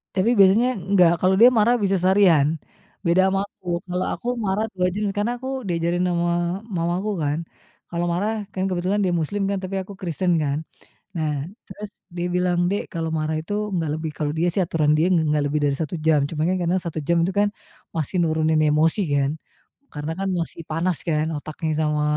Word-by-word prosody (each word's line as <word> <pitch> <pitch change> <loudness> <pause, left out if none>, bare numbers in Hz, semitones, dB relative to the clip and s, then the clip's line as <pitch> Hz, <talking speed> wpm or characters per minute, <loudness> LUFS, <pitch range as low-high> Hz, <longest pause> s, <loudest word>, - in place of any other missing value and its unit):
Tapi 190 +4 +2
biasanya 200 +6 +6 0.3
nggak, 180 -4 +6
kalau 185 +1 +4
dia 240 - +9
marah 230 +3 +4
bisa 195 0 +2
seharian, 175 -5 +4 0.5
beda 170 +2 +4
ama 195 0 0
aku, 190 -2 -20 0.2
kalau 180 +1 -1
aku - - -7 0.2
marah 200 +3 0
2 180 -1 +1
jam 210 +2 -2
karena 210 +3 +1
aku 260 +2 -7 0.2
diajarin 170 +1 0
ama 175 0 +1 0.5
mamaku, 175 +5 -1
kan, 145 +2 0 0.5
kalau 170 0 -2
marah, 200 +5 0 0.2
kan, 185 - -2
kebetulan 185 +3 0
dia 180 - +1
muslim, 205 +6 -2
kan, 200 - 0
tapi 185 +1 -4
aku 200 - -10
kristen, 180 0 -1
kan. 140 0 0 0.6
Nah, 155 -1 0 0.4
terus 205 +2 -8 0.3
dia 175 0 -2
bilang, 180 -1 +1
"Dek, 200 +2 -1
kalau 165 -2 -2
marah 155 0 -1
itu 165 +6 -6 0.2
nggak 165 -3 -1
lebih." 160 0 -4
kalau 150 -1 -1
dia, 170 +2 +2
sih, 195 - +1
aturan 155 -3 +1
dia 160 - +3
ng 175 - +4 0.2
nggak 150 -1 +1
lebih 150 +1 0
dari 140 -1 +1
1 160 +2 -3
jam. 160 -2 +5
Cuman, 155 -1 -2
kan, 185 - +1
karena 175 +2 +1
1 165 -2 -3
jam 170 - +3
itu, 190 - -2
kan, 205 0 +3 0.5
masih 160 +2 -3
nurunin 160 -1 +2
emosi, 155 +6 +2
kan, 140 -1 +2 0.6
karena, 150 +1 -4
kan, 195 - -1
masih 165 0 -5
panas, 165 +2 0
kan, 155 -1 +1
otaknya 155 +2 -4
sama 150 -1 +1
175 Hz, 195 wpm, -23 LUFS, 155-190 Hz, 0.6 s, dia